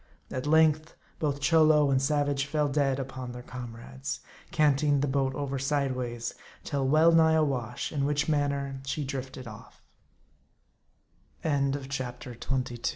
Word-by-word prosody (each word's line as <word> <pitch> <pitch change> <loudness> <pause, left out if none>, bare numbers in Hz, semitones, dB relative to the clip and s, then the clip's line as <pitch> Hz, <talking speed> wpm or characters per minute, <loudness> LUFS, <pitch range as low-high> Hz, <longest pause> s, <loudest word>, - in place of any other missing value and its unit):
At 130 +3 -3
length 155 0 +3 0.2
both 145 -2 -1
Cholo 155 -1 +5
and 130 -1 +3
savage 145 -1 +1
fell 150 0 +1
dead 135 -2 +1
upon 130 -2 -5
their 125 0 -8
comrades, 130 +2 -7 0.3
canting 145 -1 +3
the 145 - +1
boat 135 -1 0
over 140 -1 -2
side 135 -1 0
ways, 120 -2 -4 0.3
till 140 -2 -1
well 155 +4 +5
nigh 160 -1 +5
awash; 140 -8 0
in 145 -3 -1
which 145 0 +1
manner 140 -3 0
she 140 +2 -2
drifted 130 -2 -6
of 105 -2 -12
140 Hz, 125 wpm, -28 LUFS, 130-150 Hz, 0.3 s, Cholo